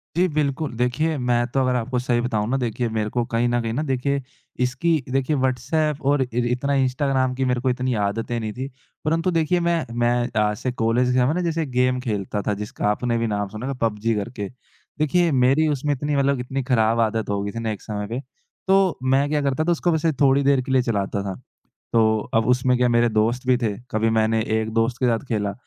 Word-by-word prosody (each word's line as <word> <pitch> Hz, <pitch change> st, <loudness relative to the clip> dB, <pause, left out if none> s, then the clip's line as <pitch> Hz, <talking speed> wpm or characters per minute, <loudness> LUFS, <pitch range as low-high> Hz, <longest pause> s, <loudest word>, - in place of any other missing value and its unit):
जी 180 Hz, +2 st, +3 dB
बिल्कुल, 150 Hz, -2 st, -1 dB
देखिए 125 Hz, +7 st, 0 dB
मैं 120 Hz, -2 st, +1 dB
तो 135 Hz, -, +2 dB
अगर 130 Hz, -1 st, +1 dB
आपको 125 Hz, +1 st, -1 dB
सही 120 Hz, -1 st, 0 dB
बताऊँ 110 Hz, -4 st, -1 dB
ना 135 Hz, -, +1 dB
देखिए 120 Hz, -1 st, -1 dB
मेरे 110 Hz, -1 st, -1 dB
को 120 Hz, +2 st, 0 dB
कहीं 115 Hz, +1 st, +2 dB
न 120 Hz, 0 st, +1 dB
कहीं 115 Hz, -1 st, -3 dB
न 150 Hz, +6 st, -1 dB
देखिए, 140 Hz, +1 st, 0 dB, 0.4 s
इसकी 135 Hz, +6 st, +1 dB
देखिए 135 Hz, +3 st, 0 dB
व्हाट्सएप 145 Hz, +3 st, 0 dB
और 145 Hz, -1 st, +2 dB
इर 125 Hz, -1 st, -1 dB
इतना 140 Hz, +3 st, 0 dB
इंस्टाग्राम 130 Hz, 0 st, 0 dB
की 130 Hz, +1 st, 0 dB
मेरे 125 Hz, -1 st, 0 dB
को 130 Hz, -, +1 dB
इतनी 125 Hz, 0 st, -1 dB
आदतें 115 Hz, +4 st, -2 dB
नहीं 110 Hz, -2 st, -4 dB
थी। 130 Hz, +3 st, -5 dB, 0.4 s
परंतु 165 Hz, +3 st, +1 dB
देखिए 165 Hz, +2 st, +1 dB
मैं 170 Hz, -1 st, 0 dB
मैं 120 Hz, 0 st, +2 dB
अ, 110 Hz, -3 st, +1 dB
जैसे 105 Hz, +5 st, -3 dB
कॉलेज 120 Hz, +1 st, +1 dB
के -, -, +1 dB
समय 125 Hz, +4 st, +3 dB
ना 180 Hz, -, -1 dB
जैसे 165 Hz, -2 st, -1 dB
गेम 125 Hz, -1 st, +1 dB
खेलता 105 Hz, -4 st, -3 dB
था 105 Hz, -, +2 dB
जिसका 105 Hz, -, -3 dB
आपने 115 Hz, +3 st, 0 dB
भी 115 Hz, 0 st, 0 dB
नाम 105 Hz, -1 st, -1 dB
सुना 110 Hz, +5 st, -6 dB
था 140 Hz, -, -2 dB
पबजी 110 Hz, +1 st, 0 dB
करके। 105 Hz, 0 st, -4 dB, 0.5 s
देखिए 170 Hz, +2 st, +2 dB
मेरी 135 Hz, +4 st, +3 dB
उसमें 145 Hz, 0 st, 0 dB
इतनी 145 Hz, +2 st, -2 dB
मतलब 140 Hz, -1 st, +2 dB
इतनी 135 Hz, +2 st, -3 dB
खराब 115 Hz, -3 st, +2 dB
आदत 110 Hz, -1 st, 0 dB
हो 100 Hz, -1 st, 0 dB
गई 100 Hz, -, -3 dB
थी 115 Hz, -, -5 dB
ना 115 Hz, -1 st, -2 dB
एक 105 Hz, -, -6 dB
समय 105 Hz, -2 st, -4 dB
पे, 115 Hz, +4 st, -3 dB, 0.5 s
तो 190 Hz, -1 st, +3 dB
मैं 135 Hz, +2 st, +3 dB
क्या 150 Hz, 0 st, +1 dB
करता 140 Hz, +2 st, 0 dB
था 175 Hz, -, +1 dB
उसको 175 Hz, +1 st, +1 dB
वैसे 160 Hz, 0 st, +1 dB
थोड़ी 140 Hz, 0 st, +4 dB
देर 140 Hz, -1 st, +3 dB
के 130 Hz, -, -5 dB
लिए 130 Hz, -1 st, +4 dB
चलाता 100 Hz, -4 st, -1 dB
था, 95 Hz, -1 st, -4 dB, 0.6 s
तो 110 Hz, -1 st, +3 dB, 0.2 s
अब 110 Hz, 0 st, +3 dB
उसमें 125 Hz, 0 st, +3 dB
क्या 125 Hz, 0 st, +3 dB
मेरे 120 Hz, 0 st, +3 dB
दोस्त 115 Hz, +3 st, 0 dB
भी 125 Hz, -1 st, +4 dB
थे, 115 Hz, -4 st, 0 dB, 0.2 s
कभी 110 Hz, +1 st, +1 dB
मैंने 110 Hz, 0 st, +2 dB, 0.2 s
एक 110 Hz, 0 st, -3 dB
दोस्त 115 Hz, +2 st, +1 dB
के -, -, +4 dB
साथ 115 Hz, 0 st, 0 dB
खेला, 105 Hz, -3 st, -1 dB
125 Hz, 225 wpm, -23 LUFS, 115-140 Hz, 0.6 s, थोड़ी